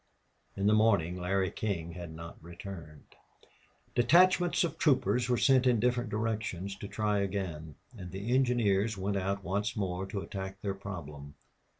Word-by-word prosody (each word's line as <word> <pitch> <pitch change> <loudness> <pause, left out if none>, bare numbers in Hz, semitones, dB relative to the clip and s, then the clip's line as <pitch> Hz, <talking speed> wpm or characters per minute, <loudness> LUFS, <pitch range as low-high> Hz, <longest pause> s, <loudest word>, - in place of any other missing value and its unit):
In 100 - -2
the 105 - +5
morning 100 -6 +3
Larry 95 +1 0
King 85 -6 -3
had 85 -1 -7
not 85 0 -10
returned. 85 -3 -10 0.8
Detachments 175 +7 +4
of 170 - -3
troopers 125 -4 +2
were 125 - +3
sent 130 +1 +4
in 120 -3 +4
different 120 0 +1
directions 105 -3 -2
to 100 - -7
try 105 0 0
again. 90 -7 -3 0.2
And 90 -5 -8
the 100 +6 -3
engineers 115 -5 +2
went 100 +1 -1
out 100 +1 -2
once 100 +4 -1
more 95 -2 -2
to 100 0 -4
attack 95 0 -6
their 100 -1 -1
problem. 75 -8 -8
100 Hz, 155 wpm, -31 LUFS, 90-115 Hz, 0.8 s, the